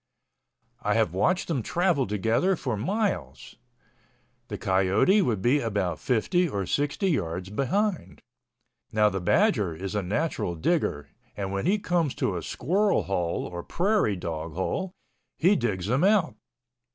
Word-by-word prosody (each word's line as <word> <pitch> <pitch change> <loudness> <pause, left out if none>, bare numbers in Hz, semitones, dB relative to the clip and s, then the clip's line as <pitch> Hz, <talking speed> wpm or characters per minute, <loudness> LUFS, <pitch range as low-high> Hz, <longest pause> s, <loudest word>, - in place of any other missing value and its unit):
I - - 0
have - - +1
watched 180 - +1
them 150 -7 -1
travel 170 - +1
together 115 - +1
for 130 -8 -3
miles. 200 - -3 0.9
The - - -5
coyote 95 - +3
would 110 - -1
be 130 +5 +3
about 100 -7 -2
50 170 - +1
or 100 -6 -2
60 145 - 0
yards 90 - -2
behind. 140 - -1 0.7
Now 105 -1 +4
the 95 -2 -3
badger 105 - +2
is 95 +5 -5
a 105 - 0
natural 100 - -2
digger 80 - -1 0.3
and 100 -1 -3
when 100 +9 -2
he 200 +3 +3
comes 175 -7 0
to 95 - -1
a 85 - -3
squirrel 195 - +1
hole 90 -3 -2
or 85 0 -6
prairie 185 - +1
dog 80 -2 -5
hole, 180 - -2 0.5
he 185 +6 +4
digs 100 - -1
him 130 +8 +1
out. 195 -4 +3
120 Hz, 145 wpm, -26 LUFS, -, 0.9 s, Now